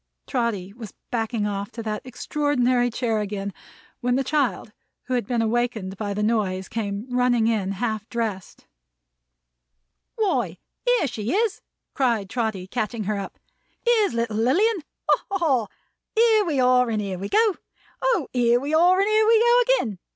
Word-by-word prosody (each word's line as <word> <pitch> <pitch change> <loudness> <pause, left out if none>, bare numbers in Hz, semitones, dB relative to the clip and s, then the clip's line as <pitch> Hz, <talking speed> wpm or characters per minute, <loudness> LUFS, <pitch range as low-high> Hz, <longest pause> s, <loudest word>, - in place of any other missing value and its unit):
Trotty 220 -7 -2
was 220 -3 -10 0.2
backing 225 -2 -1
off 200 0 -3
to 230 - -6
that 215 -1 -3
extraordinary 255 -1 0
chair 230 -2 -1
again, 200 -1 -4 0.5
when 245 0 +1
the 270 - +1
child, 270 -5 0 0.3
who 255 - -4
had 240 -5 0
been 235 -2 +1
awakened 225 -4 -1
by 205 0 -3
the 210 - -1
noise, 200 -4 0
came 205 -1 -3
running 245 -2 +2
in, 210 -4 0
half 215 +1 -3
dressed. 220 -6 -4 1.5
"Why, 435 -4 0 0.3
here - - +3
she 225 -2 -3
is!" 435 -1 0 0.3
cried 230 -7 0
Trotty 220 -6 -2
catching 220 +2 -3
her 205 0 -1
up. 195 - -7 0.5
"Here's 445 - +3
little 230 -2 -1
Lilian! 360 - +2 0.3
Ha, - - +3
ha, 395 - 0
ha! 270 - +1 0.5
Here 440 -2 +4
we 300 -6 0
are 250 -1 +4
and 220 -2 0
here 195 -3 -3
we 200 +1 -4
go! 435 - +3 0.4
O, 470 - +1
here 240 -1 +3
we 285 +4 -4
are 355 +4 +5
and 395 - +3
here 430 0 +3
we 450 0 +6
go 475 +2 +5
again! 225 - +1
240 Hz, 165 wpm, -24 LUFS, 210-295 Hz, 1.5 s, we